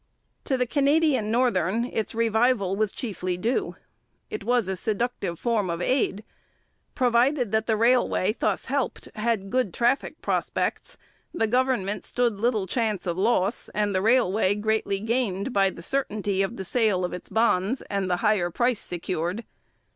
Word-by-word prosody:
To 265 - +1
the 250 - +1
Canadian 280 -3 +2
Northern 230 -3 +1
its 225 -3 -3
revival 225 -3 +2
was 215 0 0
chiefly 185 -7 -4
due. 230 +8 -1 0.6
It 425 - -4
was 240 -4 +1
a 190 - -1
seductive 205 -3 -2
form 220 -4 0
of 170 0 -2
aid: 215 -1 0 0.7
provided 245 0 +2
that 220 0 0
the 220 -2 +2
railway 230 -3 +2
thus - - 0
helped 275 0 -2
had 215 -3 -1
good 255 -8 0
traffic 245 +3 0
prospects, - - -2 0.4
the 225 - +2
government 230 -4 0
stood 235 -4 0
little 220 -3 +1
chance 215 0 -1
of 175 -2 -1
loss 200 +1 +1
and 210 -1 +1
the 185 - +1
railway 215 -3 +3
greatly 210 -2 0
gained 225 0 -1
by 195 -1 +3
the 170 - -10
certainty 205 -5 -1
of 195 +5 -2
the 190 - -5
sale 205 -4 +1
of 180 - -5
its 180 - -8
bonds 225 +1 +1
and 195 -2 -2
the 180 - +1
higher 205 -5 +2
price 240 +5 +1
secured. 175 +4 -3
220 Hz, 155 wpm, -25 LUFS, 195-245 Hz, 0.7 s, railway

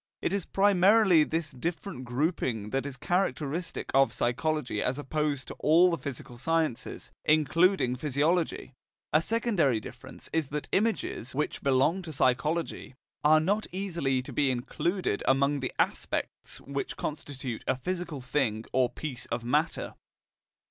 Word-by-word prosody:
It - - -1
is 200 -3 -2
primarily 195 -2 +5
this 160 0 -2
different 155 +1 -4
grouping 120 - -1
that 135 +1 -1
is 135 -2 -7
characteristic 170 0 -1
of 135 +1 +5
psychology 125 -1 -1
as 125 +1 0
opposed 145 -1 -2
to - - -5
all 170 +4 +5
the 170 - 0
physical 125 -3 -7
sciences, 160 -3 -1
including 155 -1 +3
physiology; 150 +2 0 0.4
a 155 - +5
secondary 190 - +1
difference 105 - -10
is 160 -3 +1
that 145 +1 -4
images, 200 - -1
which 150 - -2
belong 140 +7 +2
to 170 -3 -7
psychology, 150 +2 0 0.3
are 155 +1 +6
not 200 +7 0
easily 170 -9 -1
to - - -9
be 145 -2 +2
included 130 - -1
among 140 +2 +3
the 130 - -3
aspects - - -2
which 140 0 -4
constitute 135 -5 -5
a - - +2
physical 175 -1 -4
thing 125 -4 -1
or 130 -2 +3
piece 130 -5 -5
of 115 0 -3
matter. 150 +7 0
150 Hz, 140 wpm, -29 LUFS, 130-170 Hz, 0.4 s, are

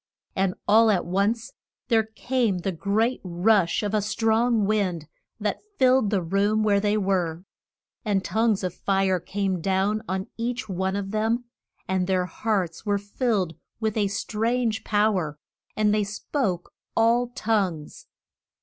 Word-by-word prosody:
And 190 -1 +1
all 220 +2 +6
at 195 -4 +2
once 205 +6 0 0.4
there 225 -2 +5
came 225 -1 -1
the 185 +2 -2
great 210 +8 0
rush 180 0 +2
of 205 0 -2
a 215 - +2
strong 225 +1 +2
wind 190 -7 0 0.3
that 210 -1 -2 0.2
filled 260 -4 +4
the 195 -4 0
room 200 +5 +1
where 205 -2 +3
they 205 +1 +1
were. 185 -4 -1 0.6
And 205 -4 0
tongues 220 -3 +1
of 180 -2 -2
fire 190 -1 +1
came 190 0 -2
down 195 +4 +1
on 190 0 -1
each 240 +1 -3
one 190 0 -1
of 200 -1 -3
them, 225 +3 0 0.4
and 185 -1 0
their 185 -1 +1
hearts 185 -2 -2
were 205 -2 +1
filled 205 -3 -1 0.3
with 220 -2 -1
a 210 -2 +2
strange 225 +3 -1
pow 210 0 +2
er, 150 -3 -5 0.4
and 210 -1 +3
they 210 -1 +2
spoke 200 - -3 0.2
all 235 +2 +4
known 245 - -26
tongues. 195 - -1
205 Hz, 150 wpm, -25 LUFS, 190-220 Hz, 0.6 s, all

